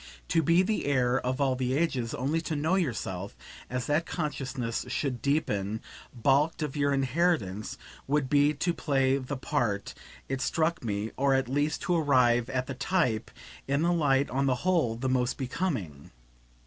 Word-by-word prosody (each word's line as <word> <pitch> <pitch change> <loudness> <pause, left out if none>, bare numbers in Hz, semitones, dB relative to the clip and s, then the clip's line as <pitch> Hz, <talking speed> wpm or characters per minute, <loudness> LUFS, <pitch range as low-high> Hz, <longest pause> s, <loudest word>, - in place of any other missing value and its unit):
To 165 - +3
be 170 +4 +4
the 215 +3 -1
heir 130 -2 +2
of 130 +2 -2
all 135 -2 +2
the 130 0 -1
ages 130 -8 0
only 145 +6 0
to 160 - -3
know 155 +4 0
yourself, 100 - -2 0.3
as 125 0 -2
that 155 +3 +1
consciousness 135 -7 -3
should 125 -1 -2
deepen, 110 -8 0 0.3
balked 140 +6 +2
of 150 -2 -4
your 145 -1 +1
inheritance, 135 - 0 0.3
would 145 -1 +1
be 145 +2 +4
to 175 +4 0
play 135 -3 +1
the 135 +1 -5
part, 105 -5 -1 0.3
it 135 0 -3
struck 165 +3 0
me, 105 -1 -2
or 135 0 +3
at 135 -2 +1
least 145 +4 0
to 180 - +1
arrive 125 -6 +3
at 130 -1 -1
the 135 - -5
type, 130 - 0 0.4
in 140 +3 +1
the 175 +1 +3
light 140 -4 +2
on 135 +1 +1
the 130 - +3
whole 165 -11 +2
the 125 +3 -3
most 130 0 +1
becoming. 125 - -3
135 Hz, 170 wpm, -28 LUFS, 125-150 Hz, 0.4 s, be